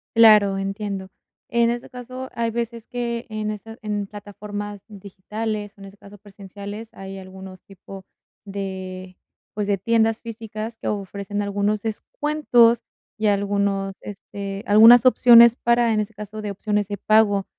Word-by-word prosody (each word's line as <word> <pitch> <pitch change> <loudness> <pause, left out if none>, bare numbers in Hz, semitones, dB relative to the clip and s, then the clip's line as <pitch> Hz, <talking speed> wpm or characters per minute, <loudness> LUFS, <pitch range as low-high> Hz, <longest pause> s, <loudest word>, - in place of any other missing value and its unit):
Claro, 210 -4 +6
entiendo. 195 -1 -4 0.4
En 235 0 +2
este 240 0 -4
caso, 255 +1 -8
hay 230 0 -1
veces 235 -1 -4
que 235 -1 -4
en 215 0 -3
estas 225 +2 -9
en 205 -2 -3
plataformas 205 0 -8
digitales, 205 +1 -6
o - - -16
en - - -9
este 195 +1 -14
caso 205 0 -15
presenciales, 205 +3 -10
hay 195 0 -8
algunos 190 0 -11
tipo 195 0 -12 0.4
de, 190 -2 -7 0.4
pues 205 -1 -3
de 200 -1 +1
tiendas 225 +2 +1
físicas 225 0 -7
que - - -7
ofrecen 200 0 -4
algunos 205 +1 -1
descuentos, 240 0 +2 0.4
y 215 - +1
algunos, 200 -1 0
este 200 0 -7
algunas 225 +4 +8
opciones 235 -2 +7
para, 235 -1 +2
en 215 - +1
ese 210 +1 -3
caso, 210 +1 -8
de 205 - -3
opciones 205 0 -1
de 205 -1 -4
pago. 205 -2 +3
210 Hz, 145 wpm, -22 LUFS, 200-225 Hz, 0.4 s, algunas